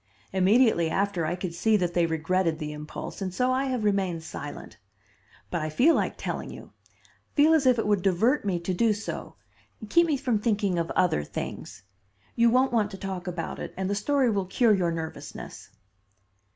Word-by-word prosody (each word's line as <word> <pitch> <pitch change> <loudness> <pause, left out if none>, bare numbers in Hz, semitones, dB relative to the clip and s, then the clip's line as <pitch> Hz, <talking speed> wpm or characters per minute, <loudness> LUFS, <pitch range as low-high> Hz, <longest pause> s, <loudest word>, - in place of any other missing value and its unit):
Immediately 190 -2 +4
after, 190 -2 0
I 175 - -1
could 180 -2 -5
see 215 +5 +2
that 175 -3 -1
they 170 -1 +2
regretted 165 +1 0
the 150 -2 -5
impulse, 150 +6 -7
and 190 -1 -2
so 250 +7 +1
I 260 +2 +1
have 255 -4 -2
remained 190 -5 0
silent. 145 -2 -8 0.7
But 175 - -1
I 155 - -2
feel 260 - +4
like - - 0
telling - - -4
you; - - -11 0.6
feel 305 +2 +5
as 295 -4 +3
if 250 -1 +5
it 225 - 0
would 205 -2 +2
divert 200 +10 +2
me 190 -4 -1
to 185 +2 -2
do 220 +4 +2
so 210 +1 -6 0.5
keep 340 +7 +4
me 300 -3 +1
from 250 -5 0
thinking 205 -5 0
of 165 - -2
other 170 - +2
things. 75 - -7 0.5
You 235 0 +4
won't 255 +2 +3
want 215 -3 +2
to 195 - -8
talk 190 -2 -5
about 175 -2 -4
it - - -7
and 190 0 -2
the 200 - 0
story 255 +4 +1
will 195 -3 -1
cure 230 +3 +3
your 180 -4 +1
nervousness." 160 -1 -7
195 Hz, 190 wpm, -27 LUFS, 175-235 Hz, 0.7 s, feel